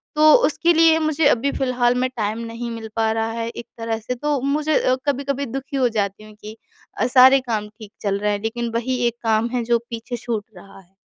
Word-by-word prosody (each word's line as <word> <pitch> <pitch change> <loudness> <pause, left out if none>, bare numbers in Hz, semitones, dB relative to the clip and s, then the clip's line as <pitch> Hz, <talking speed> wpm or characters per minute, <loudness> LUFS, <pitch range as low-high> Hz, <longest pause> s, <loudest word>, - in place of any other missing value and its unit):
तो 305 0 +6
उसके 345 +1 +2
लिए 325 0 +5
मुझे 310 -1 +1
अभी 280 0 +2
फिलहाल 250 -3 +1
में 255 0 0
टाइम 215 0 -2
नहीं 230 +1 -6
मिल 225 -1 -6
पा 225 -1 +1
रहा 225 0 -1
है, 230 0 -4
एक 235 0 -8
तरह 225 -1 -2
से 230 +3 -4
तो 295 +3 -1
मुझे 295 +3 +1
अ, 255 - +2
कभी-कभी 280 0 -1
दुखी 270 +3 -5
हो 255 -2 +2
जाती 205 -2 -2
हूँ 215 0 -14
कि 215 +1 -10 0.4
अ, - - +2
सारे 260 +1 +7
काम 210 -2 -1
ठीक 215 -1 -14
चल 200 -1 -1
रहे 210 0 0
हैं, 205 - -3
लेकिन 235 +1 -2
वही 245 +2 -1
एक 235 - -2
काम 225 +1 +1
है 245 -1 0
जो 235 0 +2
पीछे 230 +1 -5
छूट 225 -2 -3
रहा 195 +2 -14
है। 190 0 -23
235 Hz, 230 wpm, -21 LUFS, 220-270 Hz, 0.4 s, सारे